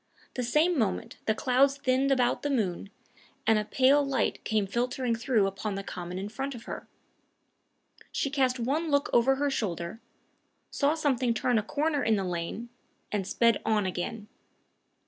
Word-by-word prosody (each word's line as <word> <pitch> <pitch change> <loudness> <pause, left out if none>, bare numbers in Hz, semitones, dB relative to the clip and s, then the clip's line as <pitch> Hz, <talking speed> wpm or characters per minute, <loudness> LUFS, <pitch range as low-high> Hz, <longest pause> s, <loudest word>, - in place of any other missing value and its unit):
The 250 - -2
same 300 +7 +2
moment 215 -4 -1
the 220 - +2
clouds 270 +4 +3
thinned 265 0 +1
about 250 -2 +2
the 290 - -2
moon, 200 -8 -1 0.6
and 220 -1 +4
a 210 - -3
pale 265 +5 +4
light 275 -1 -1
came 215 -2 +1
filtering 245 +3 -1
through 230 -3 +2
upon 195 +1 -3
the 195 - -4
common 180 -1 -6
in 195 +2 -4
front 265 +5 -4
of 235 - -10
her. - - -7 1.2
She 275 - -1
cast 260 -3 +2
one 295 +8 0
look 285 -1 +1
over 260 +3 +4
her 285 +1 0
shoulder, 185 -3 -3 0.7
saw 290 +2 +2
something 260 -6 +1
turn 240 0 +2
a - - 0
corner 290 +6 -1
in 225 - +3
the 195 - -1
lane, 180 +6 -4 0.4
and 200 -3 -1
sped 230 +1 +3
on 215 -2 +1
again. 190 +4 -4
240 Hz, 165 wpm, -28 LUFS, 210-275 Hz, 1.2 s, and